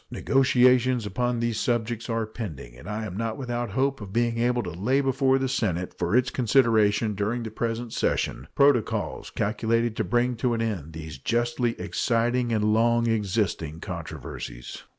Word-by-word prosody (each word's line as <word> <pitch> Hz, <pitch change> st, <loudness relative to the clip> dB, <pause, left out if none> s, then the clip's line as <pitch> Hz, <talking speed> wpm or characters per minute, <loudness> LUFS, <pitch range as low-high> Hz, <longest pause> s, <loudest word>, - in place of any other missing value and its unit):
Negotiations 125 Hz, -2 st, +3 dB
upon 120 Hz, +4 st, -1 dB
these 115 Hz, -2 st, -1 dB
subjects 120 Hz, -1 st, -1 dB
are 115 Hz, -1 st, 0 dB
pending, 95 Hz, -, -7 dB
and 60 Hz, -, -10 dB
I 110 Hz, +1 st, -3 dB
am 90 Hz, -4 st, -6 dB
not 115 Hz, +1 st, -2 dB
without 120 Hz, -2 st, -3 dB
hope 135 Hz, -1 st, 0 dB
of 100 Hz, -2 st, -8 dB
being 115 Hz, +1 st, 0 dB
able 120 Hz, +1 st, +1 dB
to 90 Hz, -, -5 dB
lay 110 Hz, -, +1 dB
before 135 Hz, -1 st, +2 dB
the 135 Hz, 0 st, 0 dB
Senate, 90 Hz, -9 st, -1 dB
for 90 Hz, +4 st, 0 dB
its 125 Hz, 0 st, +3 dB
consideration 110 Hz, -4 st, +3 dB
during 105 Hz, +4 st, -2 dB
the 110 Hz, -, -6 dB
present 115 Hz, +1 st, -3 dB
session, -, -, -1 dB
protocols 140 Hz, -5 st, +2 dB
calculated 115 Hz, +2 st, 0 dB
to -, -, +1 dB
bring 120 Hz, +5 st, +1 dB
to 120 Hz, +1 st, +1 dB
an 115 Hz, -, -2 dB
end 90 Hz, -9 st, -3 dB
these 80 Hz, -3 st, -8 dB
justly 120 Hz, -, 0 dB
exciting 120 Hz, 0 st, 0 dB
and 105 Hz, -1 st, +2 dB
long 115 Hz, +1 st, +3 dB
existing 100 Hz, -7 st, -1 dB
controversies. -, -, -7 dB
115 Hz, 165 wpm, -26 LUFS, 105-120 Hz, -, Negotiations